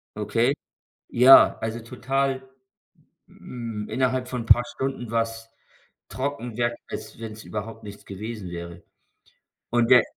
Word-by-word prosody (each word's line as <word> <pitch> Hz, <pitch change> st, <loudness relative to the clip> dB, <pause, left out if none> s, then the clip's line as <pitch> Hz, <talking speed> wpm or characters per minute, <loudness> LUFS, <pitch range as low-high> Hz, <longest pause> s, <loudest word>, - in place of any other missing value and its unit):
Okay? -, -, +1 dB, 0.6 s
Ja, 130 Hz, +3 st, +8 dB
also, 110 Hz, +1 st, -3 dB
total, 135 Hz, +3 st, -1 dB, 0.9 s
hm, 115 Hz, -4 st, -7 dB
innerhalb 130 Hz, -1 st, 0 dB
von 125 Hz, -3 st, -4 dB
paar 120 Hz, -, +6 dB
Stunden 130 Hz, -2 st, -4 dB
war's 115 Hz, 0 st, -2 dB, 0.6 s
trocken 125 Hz, -4 st, -4 dB
wer 120 Hz, -1 st, 0 dB
als -, -, -7 dB
wenn's 110 Hz, -1 st, -7 dB
überhaupt 110 Hz, +1 st, -6 dB
nichts 100 Hz, 0 st, -10 dB
gewesen 105 Hz, -1 st, -6 dB
wäre. 85 Hz, 0 st, -7 dB, 0.9 s
Und 120 Hz, -1 st, +3 dB
da 125 Hz, -1 st, +9 dB
115 Hz, 120 wpm, -25 LUFS, 110-125 Hz, 0.9 s, da